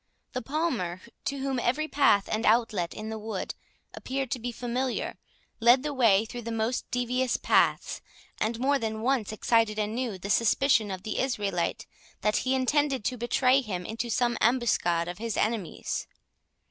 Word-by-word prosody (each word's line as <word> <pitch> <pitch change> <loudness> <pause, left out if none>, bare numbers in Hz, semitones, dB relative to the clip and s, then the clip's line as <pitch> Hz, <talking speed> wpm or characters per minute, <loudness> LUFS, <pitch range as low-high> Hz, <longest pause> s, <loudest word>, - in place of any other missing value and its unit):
The 255 - -2
Palmer, 250 - -2 0.3
to 280 - -1
whom 270 -1 -1
every 275 +6 0
path 270 -10 +3
and 215 +1 0
outlet 215 -6 +2
in 215 +1 -6
the 220 0 -4
wood 215 -3 -4 0.4
appeared 265 -2 -4
to 255 - -1
be 240 +1 -3
familiar, 245 +2 -3 0.4
led 240 +3 +5
the 300 -1 -2
way 225 -6 +4
through 240 +2 -7
the 230 0 -5
most 225 +2 -1
devious 250 +1 0
paths, - - +2 0.4
and 225 +1 -1
more 275 +2 +2
than 220 -2 -3
once 245 -5 +1
excited 220 0 +2
anew 215 0 -2
the 195 +3 -4
suspicion 230 -1 +3
of 190 -1 -5
the 215 - -3
Israelite, 205 -9 -1 0.4
that 210 0 +2
he 260 +1 +1
intended 265 -2 +1
to 255 - 0
betray 255 +3 +3
him 185 -7 -4
into 230 +3 -4
some 240 0 +1
ambuscade 215 -8 +2
of 175 +2 -6
his 230 -1 -3
enemies. 215 -6 -2
235 Hz, 165 wpm, -28 LUFS, 215-255 Hz, 0.4 s, led